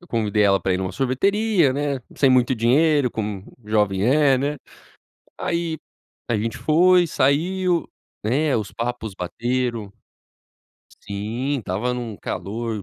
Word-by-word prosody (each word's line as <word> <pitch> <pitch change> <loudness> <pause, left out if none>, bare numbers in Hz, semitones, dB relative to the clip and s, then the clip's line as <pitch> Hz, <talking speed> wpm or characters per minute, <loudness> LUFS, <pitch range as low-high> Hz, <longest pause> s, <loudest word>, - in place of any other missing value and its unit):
eu 175 - -17
convidei 105 -2 +1
ela 100 -1 +4
pra 95 - 0
ir - - -1
numa 95 0 -3
sorveteria, 175 - +2
né, 140 -1 -2 0.2
sem 135 - +4
muito 130 0 +3
dinheiro, 135 +4 +3
como 105 -4 -4 0.2
jovem 105 -2 +1
é, 140 +1 +4
né. 140 +3 -1 0.8
Aí 170 -2 -2 0.5
a 115 - +1
gente 115 +2 -3
foi, 175 +3 +4
saiu, 175 +6 +1 0.4
né, 135 +6 +1
os 110 -2 -3
papos 115 -3 -4
bateram. 120 +2 -2 1.1
Sim, 115 +8 -3
estava 110 +5 -2
num 120 -4 -5
calor, 110 +5 -4
125 Hz, 130 wpm, -22 LUFS, 105-150 Hz, 1.1 s, ela